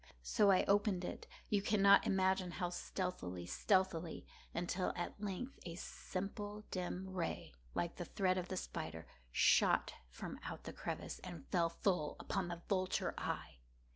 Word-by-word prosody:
So 205 Hz, -, +4 dB
I 190 Hz, -, +6 dB
opened 200 Hz, -2 st, +3 dB
it—you 205 Hz, +2 st, -3 dB
cannot 200 Hz, -1 st, +6 dB
imagine 190 Hz, -2 st, +2 dB
how 175 Hz, +1 st, -1 dB
stealthily, 175 Hz, -, -3 dB
stealthily—until, 180 Hz, -, 0 dB
at 175 Hz, +3 st, -4 dB
length 210 Hz, +6 st, -4 dB
a 170 Hz, -1 st, -5 dB
simple 205 Hz, +4 st, -4 dB
dim 185 Hz, +1 st, -2 dB
ray, 185 Hz, -3 st, -3 dB, 0.2 s
like 170 Hz, -1 st, -1 dB
the 175 Hz, -, -3 dB
thread 185 Hz, +1 st, +1 dB
of 180 Hz, -, -4 dB
the 185 Hz, -, -3 dB
spider, 80 Hz, -, -4 dB, 0.3 s
shot -, -, +5 dB, 0.2 s
from -, -, -6 dB
out -, -, -5 dB
the -, -, -6 dB
crevice -, -, -4 dB
and 175 Hz, -6 st, -8 dB
fell 170 Hz, -2 st, +3 dB
full 170 Hz, -3 st, 0 dB
upon 195 Hz, -3 st, -1 dB
the 175 Hz, 0 st, -5 dB
vulture 185 Hz, -2 st, +1 dB
eye. -, -, -3 dB
185 Hz, 140 wpm, -38 LUFS, 175-195 Hz, 0.3 s, I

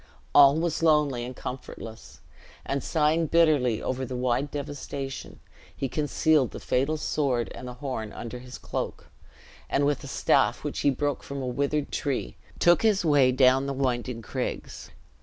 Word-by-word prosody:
All 140 Hz, +2 st, +7 dB
was 165 Hz, -1 st, -1 dB
lonely 150 Hz, -6 st, +3 dB
and 125 Hz, +1 st, -6 dB
comfortless; 115 Hz, -3 st, -8 dB, 0.4 s
and 135 Hz, 0 st, -2 dB
sighing 160 Hz, +1 st, +2 dB
bitterly 150 Hz, -9 st, +3 dB
over 130 Hz, +1 st, -2 dB
the 130 Hz, 0 st, -4 dB
wide 125 Hz, +3 st, 0 dB
devastation, 140 Hz, -1 st, -6 dB, 0.4 s
he 135 Hz, -, -1 dB
concealed 150 Hz, -1 st, +2 dB
the -, -, -8 dB
fatal 140 Hz, +5 st, 0 dB
sword 135 Hz, -6 st, -1 dB
and 125 Hz, -, -8 dB
the 125 Hz, -, -7 dB
horn 125 Hz, -5 st, -4 dB
under 120 Hz, +1 st, -7 dB
his 125 Hz, 0 st, -10 dB
cloak, -, -, -5 dB, 0.6 s
and 140 Hz, -, +2 dB
with 145 Hz, -1 st, 0 dB
a -, -, -7 dB
staff -, -, +2 dB
which -, -, -3 dB
he 145 Hz, -, +3 dB
broke 145 Hz, +1 st, -1 dB
from 140 Hz, 0 st, -6 dB
a -, -, -2 dB
withered 140 Hz, +3 st, -1 dB
tree, 135 Hz, -, -2 dB, 0.2 s
took 175 Hz, 0 st, +4 dB
his 210 Hz, -5 st, +2 dB
way 140 Hz, -4 st, +5 dB
down 130 Hz, +1 st, +4 dB
the 140 Hz, -, -2 dB
winding 125 Hz, -3 st, -2 dB
craigs. -, -, -5 dB
140 Hz, 160 wpm, -27 LUFS, 125-150 Hz, 0.6 s, All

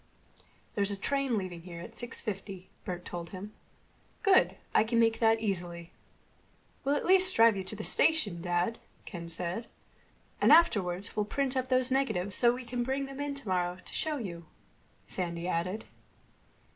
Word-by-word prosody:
"There's 200 Hz, -1 st, +1 dB
a 200 Hz, -, 0 dB
train 275 Hz, 0 st, 0 dB
leaving 185 Hz, -4 st, -5 dB
here 170 Hz, -1 st, -9 dB
at 225 Hz, +7 st, -9 dB
six 240 Hz, +2 st, -2 dB
fifty," 195 Hz, -3 st, -6 dB
Bert 180 Hz, -1 st, -5 dB
told 170 Hz, -1 st, -6 dB
him. 200 Hz, +4 st, -8 dB, 0.7 s
"Good. 395 Hz, -3 st, +4 dB, 0.2 s
I -, -, +5 dB
can 230 Hz, +1 st, 0 dB
make 225 Hz, 0 st, +3 dB
that 225 Hz, -1 st, +4 dB
easily." 175 Hz, -5 st, -3 dB, 0.9 s
"We'll 280 Hz, +1 st, +1 dB
at -, -, -2 dB
least 370 Hz, 0 st, +6 dB
drive 230 Hz, -1 st, +6 dB
you 190 Hz, -, -3 dB
to 190 Hz, -, -1 dB
the 215 Hz, -, -6 dB
station, 210 Hz, -, +3 dB
Dad," 175 Hz, +5 st, -1 dB, 0.3 s
Ken 170 Hz, -4 st, -7 dB
said. 175 Hz, +6 st, -3 dB, 0.7 s
"And -, -, +5 dB
afterward 200 Hz, -, +4 dB
we'll 210 Hz, -, 0 dB
print 270 Hz, +4 st, -1 dB
up 260 Hz, 0 st, -1 dB
those 255 Hz, 0 st, +2 dB
negatives, 200 Hz, -8 st, 0 dB
so 240 Hz, -1 st, +6 dB
we 250 Hz, +1 st, -6 dB
can 245 Hz, +1 st, -3 dB
bring 265 Hz, +3 st, -1 dB
them 275 Hz, 0 st, -9 dB
in 285 Hz, -1 st, -3 dB
tomorrow 180 Hz, -8 st, -1 dB
to -, -, -8 dB
show 310 Hz, -2 st, 0 dB
you," 170 Hz, -, -7 dB, 0.6 s
Sandy 170 Hz, -1 st, -4 dB
added. 185 Hz, +5 st, -2 dB
210 Hz, 170 wpm, -30 LUFS, 180-255 Hz, 0.9 s, least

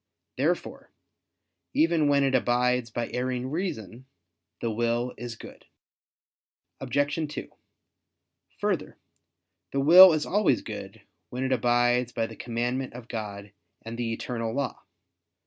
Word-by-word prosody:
Therefore -, -, -2 dB, 0.9 s
even 160 Hz, -1 st, +3 dB
when 140 Hz, -1 st, +3 dB
it 135 Hz, -1 st, +1 dB
abides 125 Hz, -1 st, +2 dB
by 120 Hz, +1 st, -4 dB
erring 125 Hz, +1 st, -2 dB
reason, 130 Hz, -, -4 dB, 0.5 s
the 115 Hz, -, -2 dB
will 120 Hz, +2 st, -1 dB
is 120 Hz, -1 st, -7 dB
good. -, -, -13 dB, 1.1 s
Obj. 145 Hz, +2 st, 0 dB
2: -, -, -6 dB, 1.1 s
Further, -, -, -2 dB, 0.7 s
the 140 Hz, -, -1 dB
will 175 Hz, +5 st, +9 dB
is 155 Hz, -1 st, 0 dB
always 195 Hz, -, +2 dB
good, 105 Hz, -1 st, -8 dB, 0.3 s
when 125 Hz, +6 st, -4 dB
it 130 Hz, -, -1 dB
abides 120 Hz, -1 st, +2 dB
by 115 Hz, -, 0 dB
the -, -, -9 dB
commandment 120 Hz, +2 st, -3 dB
of 120 Hz, -1 st, -10 dB
God 105 Hz, -3 st, -6 dB, 0.3 s
and 115 Hz, +1 st, -6 dB
the 115 Hz, -1 st, -2 dB
eternal 115 Hz, 0 st, -3 dB
law. 140 Hz, -1 st, -3 dB
125 Hz, 125 wpm, -27 LUFS, 115-135 Hz, 1.1 s, will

